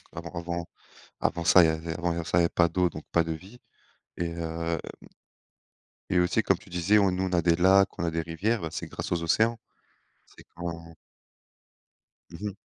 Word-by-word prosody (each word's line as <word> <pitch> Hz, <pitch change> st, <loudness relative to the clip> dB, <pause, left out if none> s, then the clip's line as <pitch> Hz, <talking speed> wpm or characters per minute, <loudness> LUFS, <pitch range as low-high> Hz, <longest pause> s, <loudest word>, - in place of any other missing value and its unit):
Avant 85 Hz, +1 st, -6 dB
avant 85 Hz, 0 st, -4 dB, 0.5 s
avant 85 Hz, 0 st, -1 dB
ça, 90 Hz, -, +7 dB
il -, -, +5 dB
y -, -, +3 dB
avait 80 Hz, +1 st, -3 dB
avant 85 Hz, -1 st, -2 dB
ça, 85 Hz, -, 0 dB
il -, -, +5 dB
y -, -, +3 dB
avait 85 Hz, -, +2 dB
pas 85 Hz, -1 st, +3 dB
d'eau, 90 Hz, +1 st, +1 dB
donc 75 Hz, 0 st, -9 dB
pas 85 Hz, -, +3 dB
de 80 Hz, -, -4 dB
vie, 95 Hz, +10 st, -12 dB, 0.6 s
et 85 Hz, -1 st, -2 dB
heu, 85 Hz, 0 st, -3 dB, 0.2 s
m -, -, -14 dB, 1.0 s
et 90 Hz, -, +3 dB
aussi 90 Hz, +5 st, +2 dB
comme 95 Hz, -, +2 dB
tu 100 Hz, 0 st, -18 dB
disais, 90 Hz, +5 st, +3 dB
on 95 Hz, -2 st, +3 dB
nous 95 Hz, +1 st, -1 dB
on 95 Hz, -1 st, -2 dB
a 85 Hz, -, +3 dB
des 85 Hz, 0 st, +3 dB
lacs, 95 Hz, +2 st, +4 dB
on -, -, -1 dB
a 85 Hz, -, 0 dB
des 80 Hz, 0 st, -1 dB
rivières, 100 Hz, +8 st, -1 dB
bah 80 Hz, -, -3 dB
c'est -, -, -5 dB
grâce -, -, -6 dB
aux 85 Hz, -1 st, 0 dB
océans. 110 Hz, +7 st, +2 dB, 0.7 s
C'est -, -, -18 dB
quand 85 Hz, -1 st, -6 dB, 1.4 s
Mmh 85 Hz, -, -10 dB
mh. 100 Hz, -, -11 dB
85 Hz, 215 wpm, -27 LUFS, 85-95 Hz, 1.4 s, ça